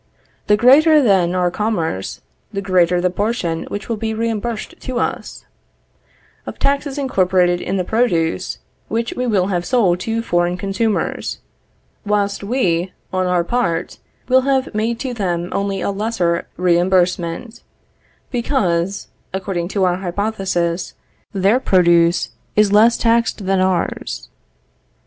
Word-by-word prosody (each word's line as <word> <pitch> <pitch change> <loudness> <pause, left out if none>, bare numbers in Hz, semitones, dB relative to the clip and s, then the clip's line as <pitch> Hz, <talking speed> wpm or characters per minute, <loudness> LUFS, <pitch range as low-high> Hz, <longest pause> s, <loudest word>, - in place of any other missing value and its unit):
The 210 0 +4
greater 300 +7 +6
then 190 -8 +3
our 180 -1 +1
commerce, 170 - -2 0.3
the 200 - -3
greater 180 -2 +2
the 180 0 +1
portion 185 -5 -2
which 205 - -6
will 230 - -2
be 220 0 -3
reimbursed 225 0 -3
to 255 -2 -4
us, - - -3 1.0
of - - -6
taxes 280 0 0
incorporated 185 -9 +2
in 195 - -2
the 185 - 0
produce, 175 -7 0 0.3
which 230 +1 -2
we 250 0 -2
will 195 -4 +1
have 175 -1 0
sold 185 -5 +2
to 225 +4 -2
foreign 175 -3 0
consumers; 200 +3 -1 0.7
whilst 205 -1 0
we, 190 -6 0 0.2
on 185 0 +1
our 180 -1 +2
part, 175 -5 -1 0.3
will 260 +1 +5
have 265 -1 0
made 225 +2 -1
to 260 -2 -3
them 175 -5 -2
only 200 -1 -2
a - - -1
lesser 195 -5 -1
reimbursement, 180 +4 +1 0.7
because 200 -8 -1 0.3
(according 185 -2 -2
to 195 +1 -1
our 180 -1 +2
hypothesis) 185 -2 -2 0.4
their 200 +5 +2
produce 175 -5 +3 0.2
is 210 -1 +3
less 225 +3 +5
taxed 230 -3 +1
than 195 0 +2
ours. 185 -2 -2
195 Hz, 130 wpm, -19 LUFS, 175-230 Hz, 1.0 s, greater